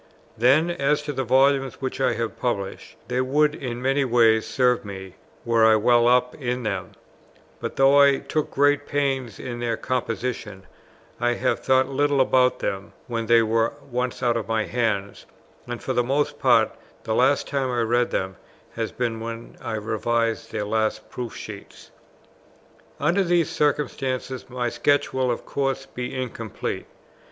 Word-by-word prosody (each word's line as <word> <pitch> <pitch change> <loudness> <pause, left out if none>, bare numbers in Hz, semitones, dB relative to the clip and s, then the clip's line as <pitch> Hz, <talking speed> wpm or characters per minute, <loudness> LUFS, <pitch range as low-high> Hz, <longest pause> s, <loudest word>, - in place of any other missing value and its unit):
Then, 140 +9 +4
as 150 -2 0
to 150 0 -4
the 135 0 -1
volumes 135 +2 +2
which 135 0 -4
I 130 -2 +3
have 115 0 -4
published, 100 -6 -3
they 125 +1 0
would 150 +3 +2
in 125 -3 -5
many 135 +2 +2
ways 115 -3 +3
serve 125 +1 +2
me, 95 -2 -8 0.3
were 115 -1 +3
I 110 0 +7
well 120 +2 +4
up 125 0 +3
in 125 -2 -3
them: 100 -4 -3 0.7
but - - -5
though 135 +1 +5
I 140 -1 +5
took 155 +2 -2
great 145 +1 +2
pains 135 -6 -1
in 120 -2 -5
their 115 -2 -1
composition, 115 -5 -3 0.6
I 120 0 +1
have 125 - 0
thought 130 0 +3
little 145 +1 +1
about 125 -1 +3
them, 100 -3 -4
when 115 -2 -3
they 115 0 +5
were 115 +1 +1 0.2
once 125 +1 -2
out 120 -1 +2
of 115 - -4
my 110 -1 0
hands, 110 -5 -2 0.4
and 120 -1 -6
for 130 - -1
the 120 - +3
most 135 +4 -1
part - - +4 0.3
the 110 - -2
last 130 +5 +3
time 135 -2 -1
I 120 -1 0
read 120 +1 +2
them 95 -1 -3 0.4
has 115 -1 -3
been 115 -3 -2
when 115 +1 -7
I 110 - -3
revised 115 +1 -1
their 105 -2 -2
last 110 +1 -1
proof 120 -3 -6
sheets. 100 -2 -10 1.1
Under 170 +7 +2
these 175 -2 +1
circumstances 135 -3 -1
my 125 -1 -2
sketch 145 +4 +1
will 130 -1 +1
of 120 - -2
course 135 -1 -2
be 125 0 -5
incomplete. 115 -4 -5
125 Hz, 165 wpm, -24 LUFS, 115-135 Hz, 1.1 s, I